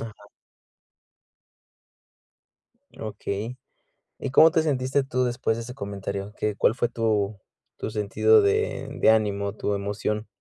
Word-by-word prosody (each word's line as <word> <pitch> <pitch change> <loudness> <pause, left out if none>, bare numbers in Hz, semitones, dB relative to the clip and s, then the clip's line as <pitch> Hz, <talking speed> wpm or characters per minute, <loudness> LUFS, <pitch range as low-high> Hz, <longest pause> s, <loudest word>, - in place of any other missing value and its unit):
Ajá. 115 -2 -7 2.8
Okey. 110 +2 -5 0.6
¿Y 135 - -4
cómo 160 +4 +7
te 160 0 +2
sentiste 135 -2 0
tú 130 -1 0
después 120 -2 0
de 115 - -4
ese 125 +2 -8
comentario? 100 -3 -5
¿Qué 105 -1 -2
Cuál 115 - +3
fue 120 -1 0
tu 110 -3 0 0.4
tu - - -4
sentido 110 - +3
de 430 +2 0
de - - +6
ánimo, 100 -2 +1
tu 105 -1 -2
emoción? 105 +2 -2
110 Hz, 125 wpm, -25 LUFS, 100-130 Hz, 2.8 s, cómo